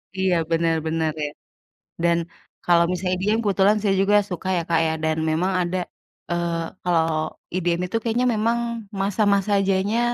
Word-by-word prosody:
Iya, 190 -2 +1 0.2
bener 165 0 +2
bener, 160 -1 0
ya. 145 - -4 0.7
Dan 170 0 +3 0.5
kalau 170 -1 +5
misalnya 180 0 -1
EDM 210 +4 +1
kebetulan 200 +1 +3
saya 200 -2 +2
juga 205 +1 +3
suka 185 +1 -4
ya, 170 - -1
Kak, 165 -1 +3
ya, 160 - +1
dan 160 0 +1
memang 180 +5 0
ada, 180 +1 -2 0.5
eee, 170 -1 -1 0.2
kalau 170 -2 +2 0.5
EDM 175 -1 0
itu 205 +5 -2
kayaknya 240 +2 0
memang 230 +2 +1 0.4
masa-masa 200 0 +1
jayanya 195 +4 +1
180 Hz, 155 wpm, -23 LUFS, 170-200 Hz, 0.7 s, kalau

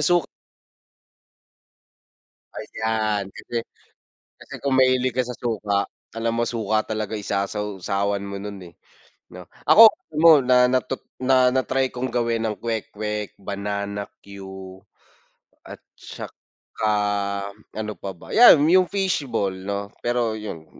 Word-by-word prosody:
suk 175 +3 +3 2.3
Ayan 110 -3 -2
kasi 120 +4 -5 0.8
kasi - - -13
kung 140 -1 0
mahilig 130 -1 +3
ka 130 - +2
sa 125 - -5
suka, 105 -4 -1 0.3
alam 115 0 -1
mo 120 - +2
suka 110 -2 0
talaga 110 -1 -3
isasaw-sawan 100 0 -2
mo 100 - -6
nun 100 0 -7
eh - - -23 0.6
no? - - -11 0.2
Ako 225 0 +9
alam 155 - -11
mo 165 - +10
na 125 -1 +4
na 130 - +4
tut 130 +1 -6 0.2
na 130 -1 +4
na-try 130 0 0
kong 125 +1 -3
gawin 115 -1 0
ang 105 - -3
kwek-kwek, 105 -2 -4
banana 100 +1 -4 0.2
que, 100 0 -11 1.2
at - - -10 0.2
saka - - -10 1.4
ano 110 0 -3
pa 100 - -7
ba, - - -10
yan 235 -8 +9
yung 180 +2 +4
fish 195 -5 0
ball 100 -4 -1
no, 100 +2 -4 0.2
pero 120 -2 0
yun, 105 -7 -7
110 Hz, 125 wpm, -23 LUFS, 100-130 Hz, 2.3 s, mo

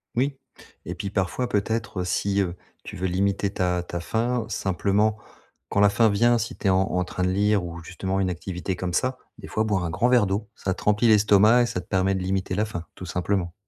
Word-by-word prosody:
Oui, 135 +3 0 0.5
et 90 - -5
puis 100 +2 -4
parfois 100 +6 -1
peut-être, 105 -2 -1
heu, - - -1
si, 100 +2 0
heu, 90 -2 -2 0.3
tu - - -8
veux 95 +1 -2
limiter 100 +2 0
ta 90 -2 0
ta 85 0 -5
faim, 115 +6 -1
simplement, 100 +3 +1 0.5
quand - - 0
la 105 - +6
faim 115 +2 +3
vient, 120 +4 +3
si 115 - -4
tu - - -2
es - - +5
en 95 0 +4
en 90 -1 0
train 90 0 -4
de 90 - +2
lire 100 +1 +2
ou 85 -1 -7
justement, 95 +2 -3
une 95 -1 +1
activité 90 +2 -4
comme 90 0 -4
ça. 130 +6 0 0.2
Des - - -10
fois, 110 - 0
boire 100 -4 0
un - - -2
grand 95 +8 +1
verre 125 -4 +5
d'eau, 100 +2 -2
ça 95 - -2
te - - -10
remplit 105 +3 +3
l'estomac 105 +2 +5
et - - +2
ça 90 - -3
te 90 - -20
permet 95 +1 +1
de 95 - -2
limiter 95 0 -1
la 105 +2 +1
faim, 85 -6 -6
tout 95 - -8
simplement. 90 0 -1
100 Hz, 235 wpm, -25 LUFS, 90-105 Hz, 0.5 s, la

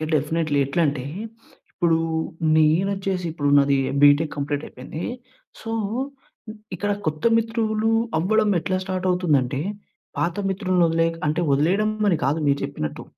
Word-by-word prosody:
Definitely. 150 0 0
ఎట్లంటే, 140 -3 0 0.7
ఇప్పుడు 170 -2 +2 0.6
నేనొచ్చేసి 185 +4 +1
ఇప్పుడు 145 -3 -1
నాది 140 -1 +4 0.2
బీటెక్ 145 +2 +5
కంప్లీట్ 145 +1 -2
అయిపోయింది. 140 +6 -8 0.6
సో, 225 - -5 1.0
ఇక్కడ 205 +3 -2 0.2
కొత్త 155 +3 -2
మిత్రులు 225 -1 0 0.3
అవ్వడం 210 +5 +2
ఎట్లా 185 +3 -1
స్టార్ట్ 185 0 -3
అవుతుందంటే, 145 -7 +1 0.6
పాత 170 0 0
మిత్రుల్ని 185 -2 +1
వదిలే 165 0 +2 0.2
అంటే 155 +3 0
వదిలేయడం 180 +10 +2 0.2
అని 180 -5 +3
కాదు 150 +4 +1
మీరు 140 0 +2
చెప్పినట్టు. 140 - -4
165 Hz, 120 wpm, -23 LUFS, 145-190 Hz, 1.0 s, బీటెక్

